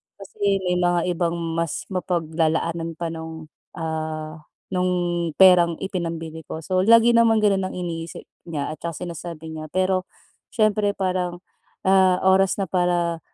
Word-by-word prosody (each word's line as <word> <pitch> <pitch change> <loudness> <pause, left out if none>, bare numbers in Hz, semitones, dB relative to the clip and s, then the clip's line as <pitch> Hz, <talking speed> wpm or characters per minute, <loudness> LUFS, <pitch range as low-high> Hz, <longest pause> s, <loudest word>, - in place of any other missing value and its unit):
Kasi 195 0 -2
may 180 -1 0
mga 175 -1 +2
ibang 170 0 -1 0.2
mas 165 -3 -2
mapaglalaanan 165 -2 -1
pa 165 0 -4
nung, 160 -1 -8 0.2
ah, 155 -2 -5 0.2
nung 175 -2 0
perang 180 -3 +6
ipinambili 165 -4 -5
ko. 160 - -6
So, 185 +3 0
lagi 230 +1 +7
naman 230 -2 +4
ganun 195 -2 +2
ang - - -8
iniisip 165 -2 -5 0.2
niya 150 -4 -3
at 155 - -8 0.2
sinasabi 165 -1 -7
niya. 155 0 -7
Pero 185 0 +1 0.5
siyempre 215 -2 +2
parang, 180 -2 -2 0.4
ah, 190 -1 +4
oras 190 0 +4
na 200 - -1
para 175 -2 +1
175 Hz, 135 wpm, -23 LUFS, 165-190 Hz, 0.5 s, lagi